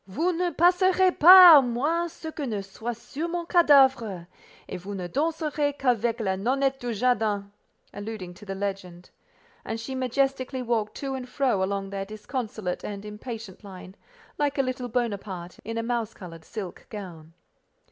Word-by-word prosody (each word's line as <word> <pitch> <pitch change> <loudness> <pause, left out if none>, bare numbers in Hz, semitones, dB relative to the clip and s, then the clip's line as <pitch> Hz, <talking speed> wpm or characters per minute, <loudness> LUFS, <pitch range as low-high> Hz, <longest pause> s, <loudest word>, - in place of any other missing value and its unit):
"Vous 325 - -1
ne 355 +1 0
passerez 365 +3 +3
pas 355 -2 +11
à - - -4
moins 295 +8 0
que 315 -2 -7
ce - - -3
ne 210 -4 -2
soit 220 +5 -6
sur 290 +8 -6
mon 345 0 -3
cadavre, 265 - +4 0.4
et - - -6
vous 195 +3 -7
ne 185 -2 -5
danserez 300 - -1
qu'avec 240 -2 0
la 190 -4 -1
nonnette 270 +5 0
du 245 -1 -3
jardin" 210 -3 0 0.4
(alluding 205 -3 -7
to 185 - -15
the 195 -1 -6
legend). 190 -3 -6 0.5
And 225 - -4
she 225 +4 -6
majestically 260 0 -1
walked 225 -3 -1
to 275 -1 -3
and 255 -1 -6
fro 250 -7 0
along 195 0 -3
their 195 0 -4
disconsolate 215 -2 -5
and 205 0 -6
impatient 215 -1 -8
line, 190 -2 -11 0.5
like 290 -1 0
a 275 - +3
little 255 -1 -3
Bonaparte 200 -7 -4
in 225 +1 -5
a 230 - -1
mouse 230 -2 -2
coloured 165 -3 -11
silk 195 -5 -8
gown. 170 -6 -9
235 Hz, 165 wpm, -26 LUFS, 200-275 Hz, 0.5 s, pas